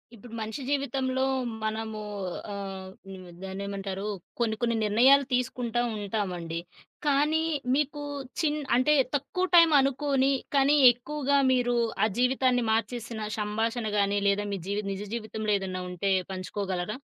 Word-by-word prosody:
ఇప్పుడు 230 Hz, +2 st, -13 dB
మనిషి 220 Hz, +5 st, -5 dB
జీవితంలో 265 Hz, -2 st, 0 dB, 0.4 s
మనము 220 Hz, 0 st, -3 dB, 0.5 s
ఆహ్, 195 Hz, -1 st, -6 dB, 0.2 s
హ్మ్. 185 Hz, -1 st, -9 dB, 0.2 s
దానేమంటారు 195 Hz, +1 st, -4 dB, 0.3 s
కొన్ని 225 Hz, -2 st, +1 dB
కొన్ని 235 Hz, -1 st, +1 dB
నిర్ణయాలు 260 Hz, +7 st, +5 dB
తీసుకుంటా 245 Hz, -1 st, 0 dB, 0.2 s
ఉంటామండి. 185 Hz, -5 st, -3 dB, 0.5 s
కానీ, 300 Hz, +3 st, +3 dB, 0.3 s
మీకు 295 Hz, 0 st, -1 dB, 0.4 s
చిన్ 305 Hz, -2 st, +1 dB, 0.2 s
అంటే 255 Hz, +4 st, +4 dB, 0.2 s
తక్కువ 290 Hz, +6 st, -1 dB
టైమ్ 335 Hz, -2 st, +8 dB
అనుకోని 275 Hz, 0 st, +2 dB, 0.2 s
కానీ 280 Hz, +1 st, +5 dB, 0.2 s
ఎక్కువగా 280 Hz, +3 st, -1 dB
మీరు 245 Hz, -1 st, +2 dB, 0.3 s
ఆ -, -, +3 dB
జీవితాన్ని 250 Hz, -1 st, +2 dB
మార్చేసిన 225 Hz, -1 st, -2 dB
సంభాషణ 220 Hz, +3 st, -1 dB
గాని 200 Hz, 0 st, +2 dB
లేదా 200 Hz, +1 st, +2 dB
మీ 200 Hz, -, -2 dB
జీవి 205 Hz, +1 st, -1 dB
నిజ 195 Hz, 0 st, -4 dB
జీవితంలో 215 Hz, -2 st, -2 dB
ఏదన్నా 185 Hz, -1 st, -4 dB
ఉంటే 180 Hz, +2 st, -1 dB, 0.2 s
పంచుకోగలరా? 190 Hz, +2 st, -3 dB
225 Hz, 125 wpm, -28 LUFS, 200-270 Hz, 0.5 s, టైమ్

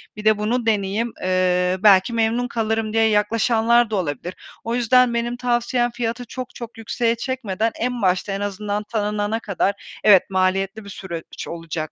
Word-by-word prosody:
bir 210 Hz, +1 st, -9 dB
de 215 Hz, -1 st, +5 dB
bunu 230 Hz, +3 st, -1 dB
deneyeyim. 215 Hz, +1 st, 0 dB
Eee, 185 Hz, 0 st, +1 dB
belki 200 Hz, +2 st, +5 dB
memnun 230 Hz, +2 st, +1 dB
kalırım." 225 Hz, -2 st, -1 dB
diye 225 Hz, 0 st, +3 dB
yaklaşanlar 230 Hz, +2 st, +2 dB
da 220 Hz, -, -2 dB
olabilir. 175 Hz, -1 st, -3 dB, 0.3 s
O 230 Hz, +1 st, -2 dB
yüzden 245 Hz, 0 st, +4 dB
benim 235 Hz, +1 st, -2 dB
tavsiyem 240 Hz, 0 st, 0 dB
fiyatı 235 Hz, +1 st, -3 dB
çok 255 Hz, +1 st, -7 dB
çok 235 Hz, -1 st, -9 dB
yükseğe 230 Hz, +1 st, -1 dB
çekmeden 230 Hz, -4 st, -2 dB
en 245 Hz, 0 st, -2 dB
başta 185 Hz, +1 st, +1 dB
en 195 Hz, +1 st, -3 dB
azından 205 Hz, +1 st, -3 dB
tanınana 210 Hz, 0 st, -2 dB
kadar 200 Hz, -1 st, -3 dB
evet 200 Hz, -2 st, +6 dB
maliyetli 195 Hz, +2 st, 0 dB
bir 200 Hz, -, -11 dB
süreç 170 Hz, -4 st, -7 dB
olacak 165 Hz, -2 st, -5 dB
215 Hz, 160 wpm, -21 LUFS, 195-235 Hz, 0.3 s, evet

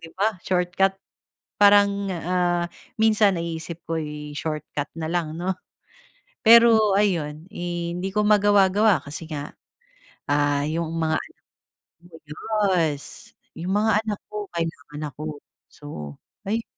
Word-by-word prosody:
'Di 165 Hz, -, -10 dB
ba, 205 Hz, -1 st, 0 dB
shortcut. 185 Hz, +1 st, +1 dB, 0.6 s
Parang, 200 Hz, -1 st, +5 dB
ah, 175 Hz, 0 st, 0 dB, 0.4 s
minsan 215 Hz, -3 st, +4 dB
naiisip 170 Hz, 0 st, -5 dB
ko, 165 Hz, 0 st, -1 dB
eh, 150 Hz, -1 st, -6 dB
shortcut 155 Hz, -2 st, -4 dB
na 160 Hz, -, -3 dB
lang, 165 Hz, -3 st, -2 dB
'no? 185 Hz, +2 st, 0 dB, 0.9 s
Pero 225 Hz, -3 st, +7 dB
ayun, 160 Hz, -6 st, 0 dB
eh, 175 Hz, -3 st, -4 dB
hindi 185 Hz, +2 st, -3 dB
ko 210 Hz, 0 st, +2 dB
magawa-gawa, 205 Hz, -2 st, +4 dB
kasi 155 Hz, +3 st, -7 dB
nga, 145 Hz, -1 st, -5 dB, 0.8 s
ah, 145 Hz, 0 st, +2 dB
yung 165 Hz, +1 st, -2 dB
mga 160 Hz, -1 st, +1 dB, 0.7 s
anak 165 Hz, -1 st, -18 dB, 0.5 s
yes, 160 Hz, -6 st, -1 dB, 0.2 s
yung 175 Hz, +4 st, -3 dB
mga 215 Hz, 0 st, +3 dB
anak 210 Hz, -2 st, -3 dB
ko 210 Hz, 0 st, -4 dB
kailangan 155 Hz, -3 st, -5 dB
ako. 150 Hz, +1 st, -7 dB, 0.3 s
So, 75 Hz, -, -9 dB, 0.3 s
ayun. 225 Hz, +3 st, -1 dB
175 Hz, 120 wpm, -24 LUFS, 155-200 Hz, 0.9 s, Pero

